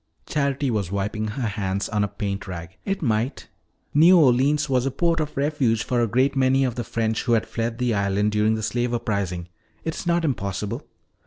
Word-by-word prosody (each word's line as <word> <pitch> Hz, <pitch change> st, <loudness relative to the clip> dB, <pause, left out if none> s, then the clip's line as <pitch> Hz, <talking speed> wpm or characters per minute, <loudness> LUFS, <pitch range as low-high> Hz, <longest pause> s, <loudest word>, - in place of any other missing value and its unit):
Charity 140 Hz, -2 st, 0 dB
was 100 Hz, -5 st, -1 dB
wiping 105 Hz, +2 st, -2 dB
her 120 Hz, +3 st, -3 dB
hands 100 Hz, -2 st, -2 dB
on 105 Hz, -2 st, 0 dB
a -, -, +1 dB
paint 100 Hz, 0 st, -4 dB
rag. 85 Hz, 0 st, -7 dB
"It 195 Hz, -3 st, -2 dB
might. 115 Hz, +1 st, -1 dB, 0.4 s
New 170 Hz, +5 st, +7 dB
Orleans 140 Hz, 0 st, +4 dB
was 130 Hz, -1 st, +1 dB
a -, -, +2 dB
port 165 Hz, +5 st, +1 dB
of 150 Hz, -3 st, -3 dB
refuge 140 Hz, -6 st, +1 dB
for 120 Hz, -1 st, 0 dB
a 115 Hz, -, +2 dB
great 130 Hz, +6 st, +2 dB
many 135 Hz, 0 st, +3 dB
of 125 Hz, -2 st, 0 dB
the 120 Hz, -, -3 dB
French 110 Hz, 0 st, -1 dB
who 115 Hz, -1 st, +4 dB
fled 115 Hz, +1 st, -3 dB
the 125 Hz, -1 st, 0 dB
island 100 Hz, +1 st, +1 dB
during 105 Hz, +1 st, +2 dB
the 110 Hz, -, -4 dB
slave 120 Hz, +2 st, 0 dB
uprising. 95 Hz, -6 st, -2 dB, 0.4 s
It 160 Hz, -, -2 dB
is 175 Hz, -, -6 dB
not 170 Hz, -1 st, +2 dB
impossible." 105 Hz, -, -3 dB
115 Hz, 195 wpm, -24 LUFS, 105-135 Hz, 0.4 s, New